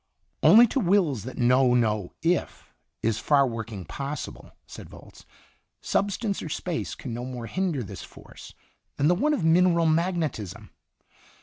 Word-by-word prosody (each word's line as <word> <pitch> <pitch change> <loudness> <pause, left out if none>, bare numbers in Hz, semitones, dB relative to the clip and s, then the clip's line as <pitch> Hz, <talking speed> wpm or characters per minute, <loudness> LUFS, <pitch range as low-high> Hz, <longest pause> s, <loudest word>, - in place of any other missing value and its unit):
"Only 230 +3 +8
to 275 - 0
wills 175 - +1
that 130 - -8
know 125 0 +3
no 110 -5 0
'if 175 +2 -1 0.3
is 115 -1 0
'far 140 +1 +3
working' 115 -6 -6
possible," 140 - -6
said - - -11
Volz. - - -15 0.5
"Substance 200 +1 -1
or 160 - -6
space 165 +2 -4
can 125 - -7
no 120 +1 -5
more 125 -2 -6
hinder 175 -2 -2
this 100 - -9
force - - -13 0.4
than 145 - +2
the - - +5
one 300 +12 +1
of 180 - -3
mineral 170 +1 +4
magnetism. 160 - -1
145 Hz, 145 wpm, -26 LUFS, 120-180 Hz, 0.5 s, Only